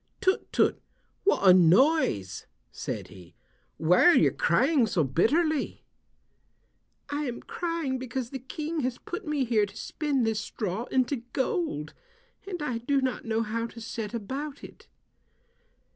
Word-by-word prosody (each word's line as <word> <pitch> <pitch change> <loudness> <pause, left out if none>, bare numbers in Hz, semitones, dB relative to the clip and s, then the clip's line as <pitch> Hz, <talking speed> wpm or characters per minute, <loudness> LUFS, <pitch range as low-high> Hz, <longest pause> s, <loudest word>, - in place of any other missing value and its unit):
"Tut, 375 0 0
tut, - - +2 0.4
what 295 - +3
a 185 - +10
noise," 180 - +3 0.2
said - - -5
he. 90 -2 -14 0.4
"Why 165 +3 +4
are 350 - +7
you - - +5
crying 270 -4 +3
so 175 -6 +1
bitterly." 285 - +1 1.3
"I 295 +1 -1
am 245 -3 -5
crying 330 -7 -2
because 250 -1 -4
the 265 - -5
King 305 +5 -4
has 255 -3 -1
put 350 - -7
me 295 -3 0
here 220 -3 +2
to - - -13
spin 290 -5 -1
this 225 -1 0
straw 215 0 -4
into 260 +2 +1 0.2
gold, 265 - -1 0.5
and 355 -6 -4
I 245 -5 -2
do 275 +4 +1
not 260 -1 -2
know 225 0 0
how 230 +1 -2
to 230 - -12
set 225 0 -5
about 275 +7 -5
it." - - -13
255 Hz, 145 wpm, -28 LUFS, 215-295 Hz, 1.3 s, a